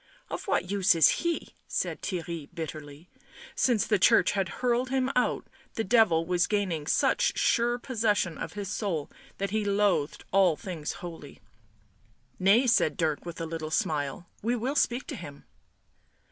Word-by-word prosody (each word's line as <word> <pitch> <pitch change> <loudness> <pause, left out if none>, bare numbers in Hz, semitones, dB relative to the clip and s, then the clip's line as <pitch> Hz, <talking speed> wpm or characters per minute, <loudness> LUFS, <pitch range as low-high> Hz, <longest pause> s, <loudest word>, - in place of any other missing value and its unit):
" - - -26
Gf - - -5
what 180 - 0
use 195 -2 +3
he!" 340 -1 -2
said - - -2
Theirry 170 -5 -4
bitterly; 155 0 -7 0.5
since 235 -5 +2
the 210 -3 +1
Church 175 - +5
had 195 -3 -1
hurled 250 +3 0
him 260 0 0
out 250 - +1 0.3
the 225 - -1
Devil 190 -7 +4
was 180 0 +1
gaining 185 -8 -1
such - - +2
sure 240 0 +2
possession 215 - 0
of - - -6
his 205 -1 -5
soul 180 -9 -2 0.3
that 200 -1 -3
he 215 0 0
loathed 200 -7 +1
all 190 -4 +4
things 160 -3 -5
holy. 170 -2 -9 1.0
"Nay," 200 +7 +5
said 160 - +3
Dirk, 160 0 -1
with 170 - -7
a 165 - -3
little 160 -1 -5
smile. 150 0 -1 0.2
"We 235 +3 0
will 250 +5 -2
speak 250 -3 +1
to 290 - -6
him." 145 - -10
195 Hz, 160 wpm, -28 LUFS, 165-230 Hz, 1.0 s, Church